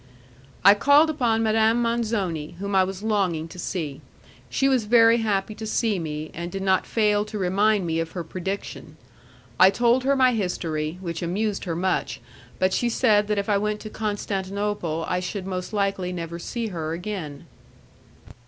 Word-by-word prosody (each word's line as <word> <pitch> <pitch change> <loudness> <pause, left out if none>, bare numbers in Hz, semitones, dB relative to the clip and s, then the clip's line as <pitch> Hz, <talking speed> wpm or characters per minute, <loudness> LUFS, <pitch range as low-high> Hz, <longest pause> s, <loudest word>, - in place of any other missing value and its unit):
I 200 - +10
called 290 +8 +5
upon 235 -6 +1
Madame 220 +1 +3
Manzoni, 215 -10 -1
whom 200 +2 -4
I 190 -1 +5
was 190 +1 -5
longing 190 -7 0
to 180 - -11
see. 155 -6 -4 0.5
She 270 - +1
was 260 -5 +2
very 230 +1 +6
happy 215 -2 -1
to 220 +1 -7
see 215 -3 0
me, 155 -1 -5
and 170 +1 -5
did 195 +1 -4
not 190 -1 +2
fail 210 -2 +2
to 215 - -6
remind 200 +1 +2
me 165 -1 -1
of 165 0 -4
her 175 - -4
prediction. 185 +4 -6 0.6
I 185 - +8
told 240 +5 +2
her 275 +1 +2
my 255 -2 +4
history, 165 -6 -2
which 170 -3 -4
amused 200 +5 -2
her 170 -3 -2
much; 185 +2 -1 0.4
but 185 0 +1
she 240 - +1
said 215 -3 +3
that 210 0 0
if 200 - -1
I 205 -2 +2
went 210 0 -1
to 215 - -8
Constantinople 200 -5 -2
I 180 - 0
should 185 +1 -5
most 185 -1 -4
likely 195 -3 -1
never 170 -1 -5
see 230 +5 -4
her 160 -4 -4
again. 170 -5 -6
200 Hz, 175 wpm, -24 LUFS, 180-220 Hz, 0.6 s, I